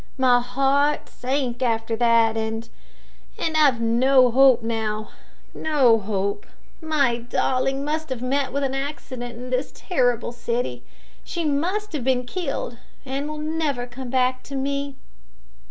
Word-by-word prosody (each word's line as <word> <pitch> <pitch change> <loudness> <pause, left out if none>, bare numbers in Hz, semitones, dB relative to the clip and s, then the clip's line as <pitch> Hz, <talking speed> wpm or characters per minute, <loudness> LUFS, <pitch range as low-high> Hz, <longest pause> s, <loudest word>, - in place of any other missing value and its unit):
My 250 -2 +5
heart 275 +4 +1
sank 255 -1 -2
after 225 -2 0
that, 230 -1 +3
and 225 +1 -3 0.7
and 320 -1 -1
I've 285 -6 +4
no 250 +2 +4
hope 260 -1 +6
now 220 -2 -2 0.4
no 265 -8 +3
hope. 200 - -2 0.3
My 285 -7 +2
darling 260 +3 0
must 310 +1 -2
have 255 -2 -4
met 270 +1 0
with 280 +2 -1
an 270 -1 0
accident 265 -3 -5
in 250 +1 -8
this 255 +2 -1
terrible 245 - 0
city. 235 - -3 0.4
She 340 -2 -3
must 350 +8 -1
have 290 -5 -2
been 250 -1 +1
killed, 275 -6 -4 0.3
and 275 +2 -3
will 305 - -5
never 305 -5 -1
come 245 +1 -8
back 255 0 +1
to 275 - -7
me." 280 +1 -2
255 Hz, 140 wpm, -23 LUFS, 235-280 Hz, 0.7 s, hope